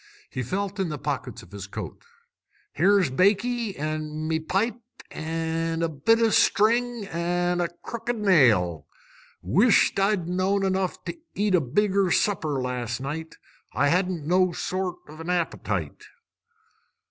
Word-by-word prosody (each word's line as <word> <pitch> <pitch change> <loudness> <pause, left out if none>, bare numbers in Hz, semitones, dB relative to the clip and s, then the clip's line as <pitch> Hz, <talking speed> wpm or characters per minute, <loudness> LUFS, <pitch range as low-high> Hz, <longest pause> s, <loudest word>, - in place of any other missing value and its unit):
He 130 - -3
felt 195 - -3
in 190 -3 0
the 150 - -4
pockets - - -4
of - - -17
his - - -7
coat. - - -7 0.7
"Here's 190 -5 +3
baccy, 210 - +1
an' 155 +1 -3
me 160 0 0
pipe, 205 +9 -1 0.3
an' 165 +1 -2
a 165 - +1
bit 160 +10 +2
o' 230 -1 +3
string, 235 +2 +3
an' 175 0 -1
a 175 - +1
crooked 230 +7 -5
nail! 115 - +3 0.6
Wish't 200 - +4
I'd 195 -3 +1
know'd 185 +2 +1
enough 190 -1 -1
to - - -4 0.2
eat 205 -1 +1
a 180 - +5
bigger 195 +7 +1
supper 160 -7 +1
last 125 -1 -3
night! 155 +4 -5 0.4
I 145 - +2
hadn't 180 -1 0
no 180 +2 +3
sort 185 0 -2
of 155 +1 -12
an 165 +2 -6
appetite." 175 -2 -2
180 Hz, 140 wpm, -25 LUFS, 155-200 Hz, 0.7 s, a